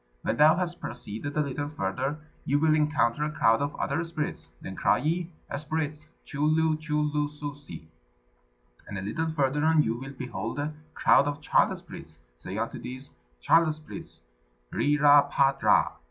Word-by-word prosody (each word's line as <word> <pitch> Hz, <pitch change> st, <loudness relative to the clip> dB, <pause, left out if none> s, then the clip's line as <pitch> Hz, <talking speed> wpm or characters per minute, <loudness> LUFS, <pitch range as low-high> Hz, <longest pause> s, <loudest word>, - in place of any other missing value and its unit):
When -, -, 0 dB
thou 155 Hz, +2 st, +7 dB
hast 175 Hz, -1 st, -3 dB
proceeded 120 Hz, +5 st, -6 dB
a -, -, +4 dB
little 145 Hz, 0 st, -3 dB
further, 135 Hz, +3 st, -2 dB, 0.3 s
you 140 Hz, -, +1 dB
will 155 Hz, +1 st, +3 dB
encounter 150 Hz, -4 st, +2 dB
a 150 Hz, -, 0 dB
crowd 115 Hz, -5 st, +3 dB
of 145 Hz, +1 st, -2 dB
other 165 Hz, -, -1 dB
spirits; 165 Hz, -3 st, -4 dB
then -, -, -7 dB
cry -, -, +3 dB
ye, 165 Hz, +4 st, -1 dB, 0.3 s
'Spirits, 150 Hz, +1 st, -3 dB, 0.2 s
chu 145 Hz, 0 st, -4 dB
lu 155 Hz, +1 st, +3 dB
chu 155 Hz, -1 st, -2 dB
lu 150 Hz, 0 st, 0 dB
ssosi!' 145 Hz, -, -8 dB, 1.0 s
And 105 Hz, -, -6 dB
a -, -, -4 dB
little 160 Hz, +11 st, -2 dB
further 150 Hz, -1 st, 0 dB
on 160 Hz, -1 st, +4 dB
you 110 Hz, -, 0 dB
will 135 Hz, +3 st, -8 dB
behold 115 Hz, -3 st, -5 dB
a 150 Hz, +2 st, -2 dB, 0.2 s
crowd 140 Hz, -, +4 dB
of 145 Hz, 0 st, -3 dB
child 145 Hz, -, +2 dB
spirits: -, -, -11 dB, 0.2 s
say 90 Hz, +11 st, -7 dB
unto 115 Hz, +1 st, -3 dB
these, 130 Hz, +2 st, -8 dB, 0.3 s
'Child 165 Hz, -, +4 dB
spirits, 155 Hz, 0 st, -10 dB, 0.5 s
Ri 145 Hz, +1 st, +2 dB
ra 145 Hz, 0 st, +7 dB
pa 135 Hz, -1 st, +4 dB
dra!' 135 Hz, -, +3 dB
145 Hz, 170 wpm, -27 LUFS, 135-155 Hz, 1.0 s, thou